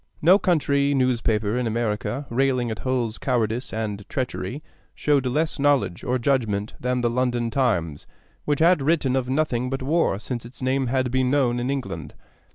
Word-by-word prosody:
No 180 +6 +6
country 140 -6 +2
newspaper 115 -4 +1
in 125 - -1
America, 115 +4 -2
railing 125 -1 +1
at 110 - -5
Hull's 125 -4 -1
cowardice 120 -2 -1
and 105 -2 -3
treachery, 130 +2 -3 0.3
showed 140 -3 +1
less 155 +5 -1
knowledge 140 -10 +1
or 125 +1 0
judgment 115 -5 0
than 125 0 -1
the 120 - +2
London 120 -1 0
Times, 85 - 0 0.4
which 145 0 0
had 170 -1 +5
written 140 -3 +1
of 130 -1 -1
nothing 130 -3 0
but 135 0 -3
war 150 - +1
since 120 +3 -5
its 120 +3 -12
name 130 0 0
had 130 0 0
been 130 0 +1
known 130 -3 +2
in 125 +2 -2
England. 85 - -4
125 Hz, 165 wpm, -24 LUFS, 115-140 Hz, 0.4 s, No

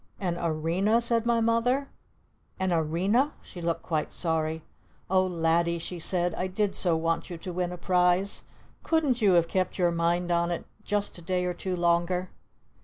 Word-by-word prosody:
"An 180 -3 -1
Arena?" 170 +7 +1
said 235 -1 +1
my 235 -1 +3
Mother. 245 +5 +1 0.7
"An 190 -1 +1
Arena?" 185 - +1
She 175 - -10
looked 170 0 -2
quite 155 -3 -2
sorry. 160 -2 -1 0.5
"Oh 185 0 +4
Laddie!" 170 0 +1
she 170 +1 -6
said. 175 0 +1
"I 185 - -2
did 195 +2 -1
so 170 -3 +2
want 165 +1 -1
you 175 - -6
to 180 +2 -7
win 180 0 -1
a 180 - -6
prize! 180 +2 +2 0.4
Couldn't 295 -7 +1
you 200 -3 +5
have 170 -1 +4
kept 185 +1 -1
your 175 -2 +3
mind 170 +1 0
on 170 0 +2
it 175 - -3 0.2
just 205 -3 -2
a - - -12
day 180 +1 -1
or 180 - -1
two 185 +1 -3
longer?" 175 +1 +1
180 Hz, 180 wpm, -27 LUFS, 170-195 Hz, 0.7 s, you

